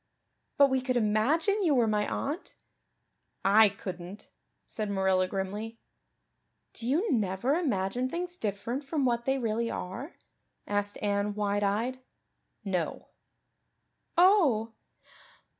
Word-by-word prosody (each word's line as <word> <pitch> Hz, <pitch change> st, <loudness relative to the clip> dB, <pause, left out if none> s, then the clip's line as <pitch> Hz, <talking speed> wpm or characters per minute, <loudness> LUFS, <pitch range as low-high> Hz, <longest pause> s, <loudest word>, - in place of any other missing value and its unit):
"But 280 Hz, -1 st, +6 dB
we 260 Hz, -1 st, +2 dB
could 255 Hz, -1 st, 0 dB
imagine 275 Hz, -, +2 dB
you 320 Hz, -7 st, +3 dB
were 240 Hz, -2 st, +4 dB
my 210 Hz, -1 st, +1 dB
aunt." 300 Hz, +7 st, -4 dB, 0.9 s
"I 210 Hz, +2 st, +7 dB
couldn't," 185 Hz, 0 st, -8 dB, 0.4 s
said 215 Hz, -2 st, -4 dB
Marilla 190 Hz, -2 st, +2 dB
grimly. 205 Hz, +4 st, -4 dB, 1.0 s
"Do 230 Hz, -, -6 dB
you 340 Hz, -, +1 dB
never 210 Hz, +2 st, +1 dB
imagine 250 Hz, -, 0 dB
things 350 Hz, +3 st, -4 dB
different 225 Hz, -, -3 dB
from 280 Hz, 0 st, -1 dB
what 235 Hz, -1 st, 0 dB
they 270 Hz, 0 st, +2 dB
really 230 Hz, -1 st, -1 dB
are?" 240 Hz, -, -6 dB, 0.5 s
asked 205 Hz, 0 st, -2 dB
Anne 205 Hz, 0 st, 0 dB
wide 205 Hz, 0 st, 0 dB
eyed. 225 Hz, +6 st, 0 dB, 0.7 s
"No." 180 Hz, -5 st, -2 dB, 1.1 s
"Oh!" 310 Hz, -, +4 dB
225 Hz, 115 wpm, -29 LUFS, 200-270 Hz, 1.1 s, I